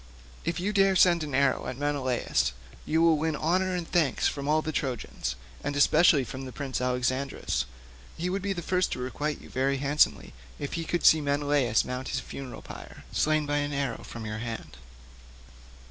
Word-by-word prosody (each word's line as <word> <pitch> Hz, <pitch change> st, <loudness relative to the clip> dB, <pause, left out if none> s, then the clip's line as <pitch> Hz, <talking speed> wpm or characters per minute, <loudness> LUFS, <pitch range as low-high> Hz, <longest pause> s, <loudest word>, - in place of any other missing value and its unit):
If 170 Hz, +2 st, -2 dB
you 200 Hz, +4 st, -1 dB
dare 195 Hz, -1 st, +4 dB
send 175 Hz, -2 st, +5 dB
an 145 Hz, -3 st, -3 dB
arrow 140 Hz, -1 st, +2 dB
at 125 Hz, -, -4 dB
Menelaus 130 Hz, -, 0 dB, 0.3 s
you 160 Hz, +1 st, +3 dB
will 165 Hz, -2 st, +5 dB
win 160 Hz, 0 st, 0 dB
honour 185 Hz, +4 st, +1 dB
and 175 Hz, -2 st, -3 dB
thanks 160 Hz, -7 st, +2 dB
from 140 Hz, -1 st, -3 dB
all 155 Hz, +1 st, +3 dB
the 155 Hz, -, -2 dB
Trojans, 125 Hz, -, -3 dB, 0.3 s
and 145 Hz, 0 st, -2 dB
especially 150 Hz, 0 st, +5 dB
from 130 Hz, +1 st, -7 dB
prince 135 Hz, -3 st, -3 dB
Alexandrus—he 125 Hz, -, -3 dB
would 190 Hz, +2 st, -1 dB
be 200 Hz, +1 st, -2 dB
the 175 Hz, -3 st, -3 dB
first 180 Hz, +1 st, +1 dB
to -, -, -5 dB
requite 145 Hz, +4 st, -3 dB
you -, -, -13 dB
very 135 Hz, +1 st, +1 dB
handsomely 140 Hz, +2 st, +2 dB, 0.2 s
if 140 Hz, -, -5 dB
he 165 Hz, -1 st, -2 dB
could 175 Hz, +1 st, -1 dB
see 155 Hz, -, +7 dB
Menelaus 145 Hz, -5 st, +2 dB
mount 125 Hz, +1 st, -4 dB
his 135 Hz, -, -1 dB
funeral 135 Hz, -1 st, -8 dB
pyre, -, -, -10 dB
slain 155 Hz, 0 st, +2 dB
by 145 Hz, 0 st, 0 dB
an 145 Hz, 0 st, -1 dB
arrow 140 Hz, -4 st, -2 dB
from 115 Hz, -1 st, -8 dB
your 110 Hz, 0 st, -4 dB
hand. 115 Hz, -, -6 dB
145 Hz, 180 wpm, -28 LUFS, 130-160 Hz, 0.3 s, see